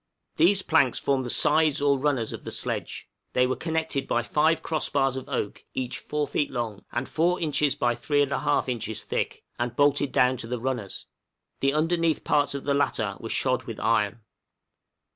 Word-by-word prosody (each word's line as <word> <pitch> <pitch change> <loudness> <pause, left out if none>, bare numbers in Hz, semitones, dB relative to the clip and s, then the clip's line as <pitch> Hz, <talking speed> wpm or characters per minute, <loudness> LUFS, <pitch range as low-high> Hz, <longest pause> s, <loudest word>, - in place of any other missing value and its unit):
These 190 +4 +4
planks 140 -6 +3
formed 135 -2 0
the - - -4
sides 155 +3 +3
or 140 -1 +2
runners 135 -5 0
of - - -8
the - - -6
sledge; - - -3 0.3
they 125 - +4
were 130 - 0
connected 160 -4 -2
by 120 - +1
five 155 +5 +2
cross 155 -2 -1
bars 135 -2 +1
of 130 +1 -6
oak, 125 -7 -3
each 130 -1 -3
4 150 -1 -2
feet 145 - 0
long, 115 -5 -4
and 120 +2 -2
4 175 +3 +1
inches 150 -3 +1
by 120 -4 +1
3 145 +4 +1
1/2 140 +1 0
inches 115 -3 -3
thick, - - -3 0.2
and 120 0 -2
bolted 145 0 +2
down 125 +1 +3
to 115 - -6
the 125 +1 -2
runners; 120 -5 -4 0.5
the 135 +1 +1
underneath 165 0 +1
parts 145 -1 +2
of 140 - -4
the 140 - +1
latter 110 -8 0
were 115 - -7
shod 130 +2 0
with 115 -4 -7
iron. 110 0 +1
135 Hz, 185 wpm, -26 LUFS, 120-150 Hz, 0.5 s, These